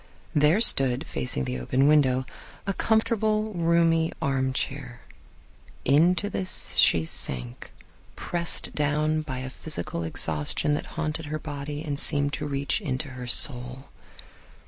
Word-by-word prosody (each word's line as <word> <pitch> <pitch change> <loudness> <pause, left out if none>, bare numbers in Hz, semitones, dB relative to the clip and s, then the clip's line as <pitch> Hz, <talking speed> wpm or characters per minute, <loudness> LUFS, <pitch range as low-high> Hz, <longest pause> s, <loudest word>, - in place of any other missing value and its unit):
There 150 +6 +4
stood, 135 - +5
facing 65 - -3
the 65 0 -4
open 130 - +1
window, 130 -4 +3 0.4
a 195 - -1
comfortable, 220 0 0
roomy 165 -1 +2
armchair. 130 -1 -2 0.8
Into 170 +8 +3
this 190 -2 0
she 80 -1 +4
sank, 65 -6 -5 0.4
pressed 170 -1 0
down 150 +1 0
by 140 -4 -6
a 130 - -5
physical 110 - -5
exhaustion 80 - +1
that 145 - -3
haunted 155 -1 -3
her 155 +1 -3
body 145 0 -6
and 145 -3 -3
seemed 145 -1 +1
to 150 - -3
reach 140 +8 -1
into 140 -4 -3
her 125 -1 -8
soul. 125 +1 -1
145 Hz, 125 wpm, -26 LUFS, 130-165 Hz, 0.8 s, stood